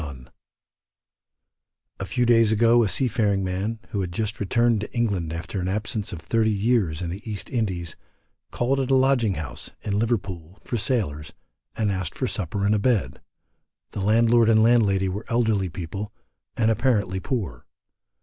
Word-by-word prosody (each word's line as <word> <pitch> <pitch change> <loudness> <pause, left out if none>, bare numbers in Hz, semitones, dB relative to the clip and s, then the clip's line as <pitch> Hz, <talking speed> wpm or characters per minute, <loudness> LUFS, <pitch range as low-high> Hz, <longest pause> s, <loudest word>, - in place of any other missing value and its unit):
A 95 - -4
few 125 +3 +1
days 115 -2 +4
ago 115 +2 +4
a 105 - 0
sea 130 - +1
faring 105 -4 +1
man, 95 +5 -2
who 100 - -2
had 90 -2 -3
just 105 +3 -3
returned 115 +2 +2
to 105 - -6
England 100 -9 0
after 85 +4 -4
an 90 - -2
absence 105 +1 -2
of 85 - -6
thirty 110 +7 +1
years 100 -6 +1
in 85 - -3
the 95 +4 -6
East 105 -2 -6
Indies, 95 -9 -2 0.5
called 130 +3 0
at 135 -1 -1
a 135 - +4
lodging 130 -6 +3
house, 70 -5 -6
in 100 -1 -1
Liverpool, 95 -6 -2
for - - -4
sailors, 100 - -1 0.4
and 105 -3 +1
asked 95 -4 -3
for 130 - -1
supper 100 -3 -2
and 105 - +3
a 105 - +2
bed; 100 - 0 0.7
the 100 - -4
landlord 115 +3 +4
and 110 -1 +5
landlady 105 -5 +3
were 100 +4 -4
elderly 110 -5 +1
people, 95 +5 -6 0.5
and 115 -1 +3
apparently 105 -5 +1
poor. 95 - -4
105 Hz, 165 wpm, -24 LUFS, 95-115 Hz, 0.7 s, and